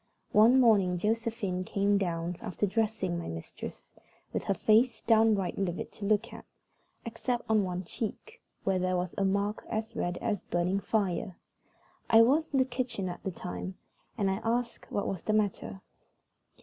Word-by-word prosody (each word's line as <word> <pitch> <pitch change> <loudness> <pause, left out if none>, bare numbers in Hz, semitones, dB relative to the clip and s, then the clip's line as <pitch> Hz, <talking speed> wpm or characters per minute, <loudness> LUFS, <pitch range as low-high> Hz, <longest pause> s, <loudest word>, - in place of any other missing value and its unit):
One 230 +5 +6
morning 200 -7 +4
Josephine 215 -2 -1
came 200 +1 +1
down 170 -2 -2
after 195 - -1
dressing 205 -4 -1
my 170 - -6
mistress 80 0 -8 0.4
with - - -2
her 195 - +1
face 220 +3 +3
downright 220 -5 +3
livid 180 -3 -2
to 205 - -7
look 215 +2 +1
at, - - -9 0.6
except 240 +1 -2
on 220 -2 +3
one 180 0 -3
check, 250 - -6 0.2
where 190 -1 +1
there 185 0 +1
was 180 0 -2
a 200 - 0
mark 200 +2 0
as 220 0 -3
red 175 0 -1
as 210 -4 -1
burning 175 +3 0
fire. 190 -3 -1 0.7
I 225 0 +8
was 300 +7 +2
in 275 - +1
the 260 - +4
kitchen 245 -7 -3
at 175 - -7
the - - -3
time, 185 +1 -6 0.4
and 195 -3 +1
I 190 +3 -2
asked 235 +1 -2
what 200 - -1
was 190 - -3
the 215 - -1
matter. 195 - -1
205 Hz, 165 wpm, -30 LUFS, 185-225 Hz, 0.7 s, I